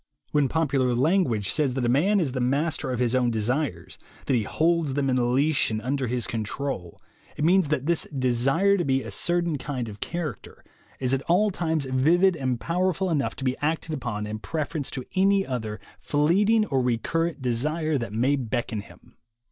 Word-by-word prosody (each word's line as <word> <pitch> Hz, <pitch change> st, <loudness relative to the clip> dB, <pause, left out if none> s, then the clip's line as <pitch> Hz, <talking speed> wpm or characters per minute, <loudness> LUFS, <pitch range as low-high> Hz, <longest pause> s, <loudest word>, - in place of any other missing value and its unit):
When 145 Hz, -3 st, +2 dB
popular 135 Hz, -5 st, +1 dB
language 130 Hz, -, +2 dB
says 140 Hz, -5 st, 0 dB
that 130 Hz, -2 st, 0 dB
a 120 Hz, +2 st, +3 dB
man 200 Hz, +8 st, +3 dB
is 155 Hz, -7 st, 0 dB
the 130 Hz, -, -3 dB
master 140 Hz, +4 st, 0 dB
of 125 Hz, -, -1 dB
his 120 Hz, 0 st, +1 dB
own 125 Hz, -1 st, +2 dB
desires, 115 Hz, -, -2 dB, 0.3 s
that -, -, 0 dB
he 120 Hz, -, +3 dB
holds 160 Hz, -, +1 dB
them 140 Hz, -2 st, +1 dB
in 125 Hz, -1 st, +1 dB
leash 145 Hz, +2 st, +2 dB
and 110 Hz, -1 st, -2 dB
under 130 Hz, +3 st, -2 dB
his 120 Hz, 0 st, -1 dB
control, 110 Hz, -4 st, -4 dB, 0.4 s
it -, -, -2 dB
means 185 Hz, 0 st, +4 dB
that 140 Hz, -2 st, -1 dB
this 170 Hz, +1 st, +1 dB
desire 135 Hz, +9 st, +2 dB
to 175 Hz, -, 0 dB
be 135 Hz, -3 st, +1 dB
a -, -, -7 dB
certain 170 Hz, -4 st, 0 dB
kind 125 Hz, -3 st, -4 dB
of 105 Hz, -2 st, -9 dB
character 160 Hz, -, -5 dB, 0.4 s
is 130 Hz, 0 st, 0 dB
at 135 Hz, -, +1 dB
all 205 Hz, +5 st, +4 dB
times 160 Hz, -5 st, -1 dB
vivid 165 Hz, +9 st, +3 dB
and 130 Hz, -5 st, -2 dB
powerful 185 Hz, +3 st, 0 dB
enough 145 Hz, -4 st, 0 dB
to -, -, -7 dB
be 130 Hz, -1 st, +1 dB
acted 160 Hz, +1 st, -1 dB
upon 115 Hz, -7 st, -3 dB
in 105 Hz, +1 st, -5 dB
prefer 155 Hz, +5 st, -3 dB
ence 140 Hz, -, -4 dB
to 130 Hz, -, -5 dB
any 195 Hz, +1 st, +3 dB
other 110 Hz, -4 st, -4 dB, 0.2 s
fleeting 200 Hz, +9 st, +2 dB
or 135 Hz, -9 st, 0 dB
recurrent 145 Hz, +7 st, -1 dB
desire 150 Hz, +5 st, 0 dB
that 115 Hz, -4 st, -5 dB
may 125 Hz, +6 st, +2 dB
beckon 120 Hz, -4 st, -2 dB
him. -, -, -18 dB
135 Hz, 190 wpm, -25 LUFS, 125-165 Hz, 0.4 s, means